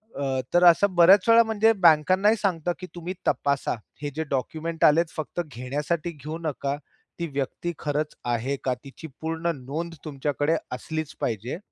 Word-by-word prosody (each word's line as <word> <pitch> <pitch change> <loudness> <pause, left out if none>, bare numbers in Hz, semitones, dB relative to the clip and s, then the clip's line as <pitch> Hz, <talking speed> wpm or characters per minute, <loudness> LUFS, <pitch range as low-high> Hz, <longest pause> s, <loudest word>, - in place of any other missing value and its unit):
अ, 135 -2 -1
तर 175 - +5
असं 180 +3 +5
बऱ्याच 185 +5 +6
वेळा 230 0 +8
म्हणजे 220 0 +3
बँकांनाही 185 +8 +4
सांगतात 175 -3 0
की 185 - -7
तुम्ही 175 +1 -5
तपासा, 140 -1 +1 0.3
हे 145 - -2
जे 160 - -1
डॉक्युमेंट 160 +5 -3
आलेत 165 +2 +4
फक्त 155 +2 -4
घेण्यासाठी 150 +6 -3
घेऊ 155 +2 -7
नका, 140 -3 -2 0.4
ती 170 - -2
व्यक्ती 140 +5 -2
खरंच 150 +1 -2
आहे 120 +3 0
का? 130 - +1
तिची 140 +4 -10
पूर्ण 165 +1 -1
नोंद 150 +6 -5
तुमच्याकडे 145 +1 0 0.2
असलीच 155 +4 -4
पाहिजे. 115 +5 -2
155 Hz, 155 wpm, -25 LUFS, 140-175 Hz, 0.4 s, वेळा